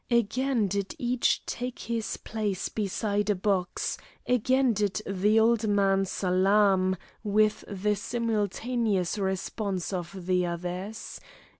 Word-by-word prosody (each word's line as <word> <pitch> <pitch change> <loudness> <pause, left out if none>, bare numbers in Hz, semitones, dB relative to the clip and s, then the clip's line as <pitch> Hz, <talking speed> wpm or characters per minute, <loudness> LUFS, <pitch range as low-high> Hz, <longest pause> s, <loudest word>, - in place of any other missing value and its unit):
Again 235 0 +2
did 200 - -2
each 250 -3 +1
take 250 +1 -4
his 230 -2 -3
place 210 -4 -3
beside 205 0 -1
a 205 - +3
box, 190 -1 -1 0.3
again 255 +1 +3
did 205 -1 0
the 205 +3 +3
old 225 0 +3
man 195 -1 +3
salaam, 190 0 +3 0.3
with 215 0 +2
the 205 +1 0
simultaneous 220 -2 -1
response 190 0 -2
of 180 0 -5
the 180 -1 +2
others. 180 +5 -5
205 Hz, 115 wpm, -28 LUFS, 190-225 Hz, 0.3 s, a